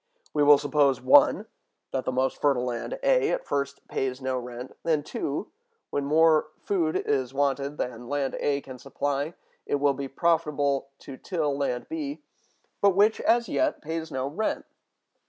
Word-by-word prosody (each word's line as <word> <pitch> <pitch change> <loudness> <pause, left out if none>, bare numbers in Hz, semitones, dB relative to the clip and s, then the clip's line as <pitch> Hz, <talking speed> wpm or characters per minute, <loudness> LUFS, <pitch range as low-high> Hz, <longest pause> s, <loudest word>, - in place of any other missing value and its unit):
We 150 - +1
will 145 0 +8
suppose 145 -2 +2
(1) 130 +1 +5 0.5
that 130 - -2
the - - 0
most 130 +1 -1
fertile 135 -4 +2
land, 125 - -3
A, - - +3
at - - -1
first 140 0 -3
pays 130 -1 -2
no 130 -1 -2
rent; 125 +1 -8
then 155 -3 +1
(2), 150 +5 -4 0.4
when 140 - -1
more 155 +1 +4
food 170 -6 -1
is 135 -2 -1
wanted 140 +1 0
than 125 -1 -5
land 140 -2 -1
A 140 -1 0
can 130 -2 -10
supply, 145 +3 -2 0.3
it - - +1
will 140 0 +2
be 135 0 -5
profitable 145 -3 +1
to 135 - -9
till 155 -5 -2
land 140 -3 -2
B, 300 -2 -5 0.6
but 200 -2 +4
which, 210 +3 +4
as 235 0 +3
yet, 320 -1 0
pays 160 +1 -4
no 130 0 -2
rent. 160 +11 -2
145 Hz, 165 wpm, -26 LUFS, 135-160 Hz, 0.6 s, will